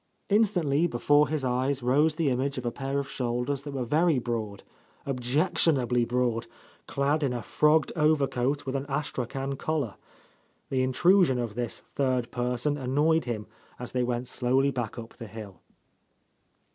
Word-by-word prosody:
Instantly 175 -8 +3
before 145 +2 +3
his 150 -3 -2
eyes 130 +1 0
rose 145 +5 +3
the 155 -4 +1
image 135 +3 -1
of 125 - -4
a 120 - 0
pair 135 +2 -3
of 140 -1 -2
shoulders 125 +1 -2
that 145 0 -7
were 130 - -1
very 155 +5 +2
broad, 115 -5 -3 0.4
objec 135 +6 0
tionably 125 -6 +2
broad, 120 -2 0 0.4
clad 145 +2 0
in 135 -4 0
a 120 - -4
frogged 150 +1 +3
overcoat 145 -3 +1
with 135 0 -3
an 135 +1 -2
astrachan 135 -1 -3
collar. 145 -9 -1 0.8
The 130 -1 +1
intrusion 145 +3 +4
of 120 -3 -3
this 120 0 -3
third 130 -3 0
person 125 +4 -1
annoyed 150 +5 +2
him 110 -4 -3 0.3
as 125 - -7
they 125 - 0
went 120 0 -1
slowly 130 +3 +1
back 120 -4 -4
up 115 -1 -9
the 115 - -8
hill. 100 -4 -10
130 Hz, 160 wpm, -27 LUFS, 120-145 Hz, 0.8 s, intrusion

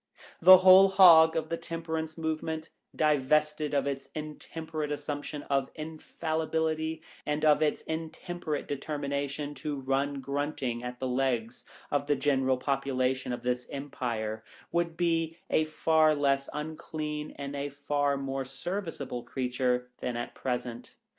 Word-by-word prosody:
The 185 +2 +11
Whole 185 +1 +8
Hog 165 -4 +8
of 160 -1 -1
the 165 - -1
Tem 165 0 -6
perance 160 -1 -3
Movement, 160 0 -3 0.2
divested 150 0 +2
of 140 -1 +2
its 135 -1 -4
intemperate 155 0 -5
assumption 145 0 -4
of 135 -1 0
infallibility 160 0 -2 0.2
and 150 +1 -1
of 150 0 +5
its 155 -1 +1
intem 165 +2 -5
perate 155 -4 -2
determination 145 0 -3
to 145 +2 -4
run 135 +1 0
grunting 140 -3 -2
at 125 0 -6
the 130 - -2
legs 125 -2 -1 0.3
of 145 0 0
the 145 - +3
general 135 -2 +2
population 130 -1 0
of 120 - -4
this, 125 0 -1
empire, 120 -6 -4 0.3
would 170 -1 0
be 165 -1 0
a 155 - +3
far 155 0 +3
less 140 -1 +1
unclean 150 0 -5
and 140 0 -5
a 140 0 -3
far 145 0 0
more 135 0 -3
serviceable 165 -4 -4
creature 125 -1 -1
than 125 -1 -3
at 120 - -4
present. 125 -2 -4
145 Hz, 140 wpm, -29 LUFS, 135-160 Hz, 0.3 s, The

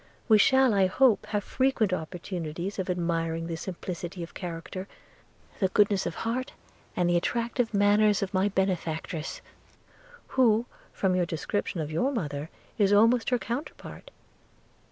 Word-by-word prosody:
We 215 -3 +6
shall, 265 +1 +5
I 195 -2 +4
hope 225 +1 +3
have 210 -1 -1
frequent 255 -7 +1
opportunities 175 +1 -4
of 190 - -2
admiring 165 -2 -1
the 165 0 -3
simplicity 175 0 -6
of 165 - -10
character, 180 +2 -6 0.7
the 190 - +3
goodness 200 0 +2
of 170 - -5
heart, 255 +3 -2 0.4
and 180 - +1
the 175 0 +3
attractive 235 +5 -1
manners 205 0 +3
of 195 - -4
my 190 +2 +2
benefactress, 170 -5 -2 0.9
who, 235 -3 +3 0.3
from 190 -2 0
your 180 -1 +1
description 175 +1 -2
of 155 0 -4
your 250 - +1
mother, 150 - -3 0.3
is 200 -1 +4
almost 225 +3 +4
her 250 - +2
counterpart. 245 - -6
190 Hz, 140 wpm, -27 LUFS, 170-220 Hz, 0.9 s, We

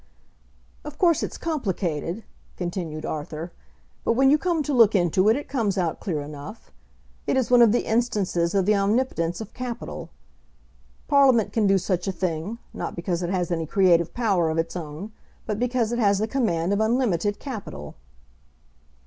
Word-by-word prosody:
"Of 300 0 -8
course 340 -4 +3
it's - - -4
complicated," 195 - -2 0.3
continued 175 -3 -4
Arthur, 155 +2 -5 0.5
"but - - +2
when 270 +3 +4
you 300 - +6
come 340 -3 0
to 290 - -2
look 230 -4 +5
into 185 +2 +3
it 220 - +5
it 290 - -5
comes 220 -7 -1
out 175 -3 -1
clear 160 -7 -2
enough. 150 +9 -9 0.6
It - - +2
is 255 -2 0
one 245 -1 +7
of 230 -3 +7
the 240 - +1
instances 205 -7 0
of 195 -2 +3
the 210 - +4
omnipotence 195 -4 0
of 220 - -8
capital. 250 -2 -6 1.0
Parliament 265 -6 +4
can 220 -3 +2
do 195 0 +4
such 185 0 -1
a - - +1
thing, 180 +3 -3 0.2
not - - -5
because 170 0 -2
it 175 - -2
has 180 -1 -1
any 165 -2 -1
creative 170 -2 +3
power 195 -9 +1
of 160 - -2
its 165 +2 -1
own, 165 +5 -6 0.3
but 210 -1 -3
because 245 -2 0
it 240 - -1
has 200 -3 +3
the 215 +2 0
command 200 -8 0
of 200 - +1
unlimited 220 -4 +1
capital." 200 - -7
200 Hz, 175 wpm, -24 LUFS, 170-235 Hz, 1.0 s, one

